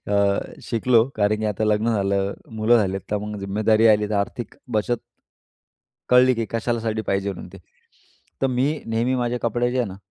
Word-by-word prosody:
अ, 100 -1 +2 0.2
शिकलो, 115 0 +3
कारण 105 0 +2
की - - -2
आता 105 +1 -1
लग्न 105 +2 +1
झालं, 100 0 0 0.2
मुलं 110 +2 +4
झाली, 95 -2 0
तर 105 - +1
मग 105 0 -6
जिम्मेदारी 110 +3 +2
आली, 105 -1 +3
तर - - 0
आर्थिक 100 +3 -3 0.2
बचत 110 +2 0 1.1
कळली 125 0 +5
की 115 0 -2
कशासाठी 115 -1 -1
पाहिजे 100 0 -1
म्हणून. 90 - -9
ते 95 - -11 0.8
तर - - +4
मी 130 +3 +2 0.2
नेहमी 115 +3 0
माझे 125 -1 -1
कपडे 120 +1 0
जे 130 - -1
आहे 120 - +1
ना 95 - -9
110 Hz, 180 wpm, -23 LUFS, 100-120 Hz, 1.1 s, कळली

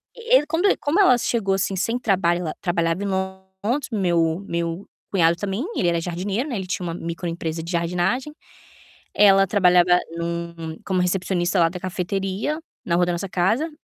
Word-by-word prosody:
e 470 +1 +4
e 295 - -4
quando 345 +5 +1
como 310 +7 +1
ela 255 -11 +6
chegou 200 -6 0
assim 195 0 -1
sem 230 +7 -1
trabalho 180 -6 +1
ela 160 -3 -3
trabalhava 170 +1 0
em - - -2
Londres, 190 +7 -3
meu 170 -4 +1
meu 170 +2 -3 0.2
cunhado 170 -3 +3
também, 200 - -3
ele 175 - +1
era 170 -1 0
jardineiro, 195 - -2
né, 245 - -3
ele 190 -1 -5
tinha 180 0 -3
uma 165 - -3
microempresa 165 -1 -4
de 170 - -6
jardinagem. 180 - -1 0.8
Ela 195 -1 +6
trabalhava 180 -2 +4 0.2
num 170 -1 -4
como 185 -2 +1
recepcionista 180 0 0
lá 165 -1 +4
da 180 +1 -7
cafeteria 195 - -2 0.3
na 170 - +1
rua 175 0 +3
da 175 - -1
nossa 180 +3 -3
casa, 215 - +1
185 Hz, 175 wpm, -23 LUFS, 170-200 Hz, 0.8 s, ela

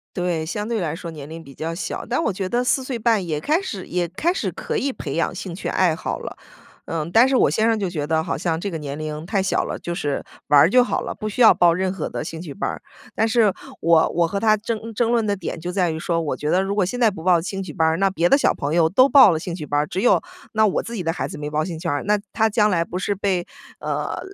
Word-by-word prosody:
对， 175 -3 -1
相 210 +6 -4
对 230 -4 -1
来 160 -2 -2
说 170 0 -7
年 150 -2 -9
龄 165 +1 -8
比 140 -3 -13
较 165 +1 -4
小。 170 - -5
但 255 +7 -1
我 215 - 0
觉 185 0 -3
得 245 +1 +1
4 260 +1 +1
岁 255 -3 -4
半 220 -4 +2
也 155 -3 -2
开 315 - +1
始 200 - -6
也 175 -1 -1
开 315 - 0
始 - - -2
可 465 - -5
以 275 -6 0
培 140 - -6
养 170 - 0
兴 180 -1 -6
趣 - - -4
爱 175 -4 +2
好 - - -4
了。 - - -7 0.5
呃， 165 0 -3
但 240 +4 +6
是 270 - +2
我 - - +4
先 220 +1 +1
生 225 -1 +1
就 190 -3 -1
觉 150 -4 -3
得 160 0 +1
好 - - -3
像 165 0 -1
这 200 - -3
个 165 - -4
年 145 -1 -6
龄 155 +1 -5
太 195 0 0
小 190 - 0
了， - - -5
就 170 0 -4
是 145 -3 -2 0.3
玩 145 -1 +6
儿 160 - +6
就 250 +2 +5
好 - - -1
了， - - -5
不 215 -1 -4
需 245 - -3
要 225 - +9
报 175 -1 +4
任 185 +1 -1
何 175 - -4
的 - - -4
兴 160 +1 -6
趣 150 -6 -7
班 - - -2
儿。 - - -6 0.3
但 220 - +2
是 225 -3 +3 0.3
我 165 -1 +4
我 170 0 +1
和 200 - -3
他 215 -1 +3
争 225 +1 -5
争 235 +2 +1
论 230 -2 +2
的 205 - +1
点 180 -3 -5
就 175 +2 -4
在 180 -2 +1
于 160 - -4
说 165 +1 -1
我 155 -3 -2
觉 150 - -3
得 185 +3 +3
如 195 +1 -2
果 200 - +2
现 245 +7 -4
在 230 -3 +5
不 165 -5 -9
报 180 -2 +4
兴 195 +3 -4
趣 165 - -7
班 160 +1 +1
儿， 160 +1 +1
那 195 0 +3
别 175 -2 +1
的 275 - +5
小 - - +2
朋 145 +1 -3
友 165 -2 +4
都 255 +9 +5
报 275 -8 +8
了 160 - 0
兴 170 +1 -5
趣 155 - -6
班 145 0 0
儿， 150 - 0
只 190 - -3
有 245 - +4 0.3
那 220 0 +4
我 195 - 0
自 235 - -7
己 190 - -3
的 165 0 0
孩 - - -3
子 - - -7
没 150 0 -4
报 155 +1 0
兴 165 -2 -5
趣 170 - -5
班 145 - 0
儿。 - - -4
那 210 0 +2
他 220 -1 +2
将 210 0 +3
来 170 -3 +2
不 180 - -6
是 200 +1 -1
被， 185 -3 -1 0.3
呃， - - -3
180 Hz, 325 characters per minute, -22 LUFS, 160-215 Hz, 0.5 s, 要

